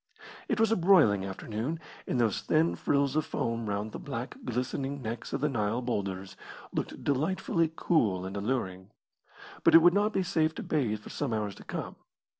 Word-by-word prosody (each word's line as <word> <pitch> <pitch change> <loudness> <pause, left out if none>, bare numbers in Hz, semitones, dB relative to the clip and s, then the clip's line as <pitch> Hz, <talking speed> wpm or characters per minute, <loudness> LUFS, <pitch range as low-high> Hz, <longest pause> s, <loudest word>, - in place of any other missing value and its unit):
It - - 0
was 225 -1 +4
a - - +5
broiling 165 - +5
afternoon, 110 - -4 0.3
and 125 - 0
those 115 -4 +2
thin 160 +2 +2
frills 140 -1 +1
of 155 - +2
foam 115 -4 -2
round 105 +2 -2
the - - -6
black, 125 -3 -5
glistening 135 +3 -2
necks 115 +1 -5
of 135 - -2
the 150 - +3
Nile 115 -2 -1
boulders 95 -5 -3 0.4
looked - - -4
delightfully 165 +3 +1
cool 105 - +1
and 95 +1 -5
alluring. 100 -4 -2 0.7
But - - +6
it 165 - +9
would 175 0 +7
not 205 +2 +2
be 190 - +1
safe 160 -3 +1
to - - -5
bathe 115 -9 0
for - - -11
some 135 -6 -2
hours 105 -2 -2
to - - -13
come. - - -5
125 Hz, 185 wpm, -29 LUFS, 105-155 Hz, 0.7 s, it